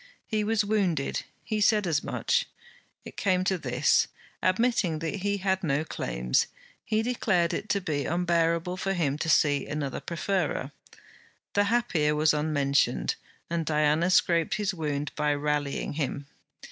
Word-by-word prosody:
He 215 -2 -1
was 215 0 +1
wounded; 190 -9 0 0.2
he 215 -1 -2
said 210 -1 +4
as 160 -3 0
much. - - 0 0.6
It - - -11
came 185 -2 +2
to 190 +1 +1
this: 130 -4 +2 0.3
admitting 185 -4 +2
that 165 +4 -3
he 200 +1 -1
had 190 -1 0
no 145 -2 +1
claims, 60 - 0 0.4
he 220 0 0
declared 200 -8 +1
it 215 - -4
to 200 - +1
be 145 -6 -2
unbearable 170 +1 +1
for 195 +1 -1
him 150 -5 0
to 160 - -2
see 145 -2 +3
another 145 -3 -3
preferred. 170 -5 -2 0.8
The 205 0 +3
happier 175 -10 +1
was 155 +1 +3
unmentioned, 140 - +1 0.3
and 170 -1 -1
Diana 155 +2 +2
scraped 170 -3 +3
his 205 -2 -1
wound 150 -4 -3
by 150 -1 +1
rallying 145 -1 -1
him. 145 -1 -3
165 Hz, 145 wpm, -27 LUFS, 150-195 Hz, 0.8 s, said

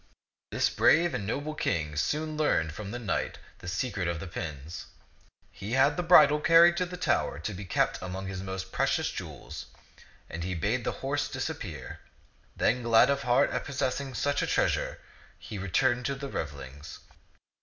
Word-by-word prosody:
This - - +2
brave 170 +1 +4
and 100 - -3
noble 145 +7 -2
King 80 - -1
soon 155 - -1
learned 80 - +1
from 100 +3 -7
the 120 - -4
knight 115 -5 -2 0.2
the - - -10
secret 95 +1 -2
of 85 -1 -2
the 95 - -6
pins. 80 -3 -6 0.6
He 105 +4 -6
had 135 +3 +4
the - - -1
bridle 150 -4 +7
car 165 +2 +7
ried 170 0 +5
to 180 0 0
the 180 0 -7
tower 70 - 0
to 85 +8 -4
be 100 +1 -7
kept 90 - 0
among 95 +1 -5
his 95 -1 -5
most 95 0 -5
precious - - +1
jewels; - - -8 0.6
and 85 +1 -6
he 90 +1 -2
bade 105 +9 -1
the - - +1
horse 145 +1 0
disappear. 125 - -5 0.6
Then, 125 +3 +2
glad 115 +3 +5
of 140 0 0
heart 125 +2 +3
at - - -2
possessing 135 -1 -2
such 145 0 0
a - - 0
treasure, - - 0 0.4
he 105 - -8
returned 120 +6 +1
to 140 - -1
the 140 0 -6
revelings. 70 - -6
115 Hz, 175 wpm, -29 LUFS, 90-145 Hz, 0.6 s, bridle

